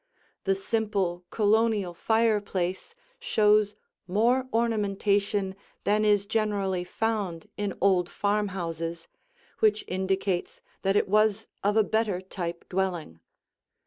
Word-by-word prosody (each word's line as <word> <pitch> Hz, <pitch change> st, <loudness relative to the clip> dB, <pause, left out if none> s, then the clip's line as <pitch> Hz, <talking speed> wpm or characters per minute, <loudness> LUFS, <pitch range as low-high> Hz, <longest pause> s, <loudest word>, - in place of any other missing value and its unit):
The 195 Hz, 0 st, +3 dB
simple 195 Hz, -4 st, -1 dB
Colonial 215 Hz, -3 st, +2 dB
fireplace 205 Hz, -, 0 dB, 0.2 s
shows 210 Hz, -1 st, +3 dB, 0.3 s
more 240 Hz, +7 st, +2 dB
ornamentation 205 Hz, -3 st, +1 dB, 0.3 s
than 210 Hz, +1 st, +2 dB
is 205 Hz, -1 st, +3 dB
generally 200 Hz, -4 st, 0 dB
found 195 Hz, -3 st, -2 dB
in 205 Hz, -2 st, -3 dB
old 185 Hz, -2 st, +3 dB
farmhouses, 170 Hz, -5 st, -2 dB, 0.5 s
which 215 Hz, -1 st, +3 dB
indicates 190 Hz, 0 st, -1 dB, 0.2 s
that 195 Hz, +1 st, +1 dB
it -, -, +3 dB
was 215 Hz, +1 st, +3 dB, 0.2 s
of 205 Hz, +2 st, +2 dB
a 220 Hz, -, +6 dB
better 220 Hz, -3 st, 0 dB
type 175 Hz, -2 st, -6 dB
dwelling. 180 Hz, -, -2 dB
200 Hz, 105 wpm, -27 LUFS, 185-215 Hz, 0.5 s, a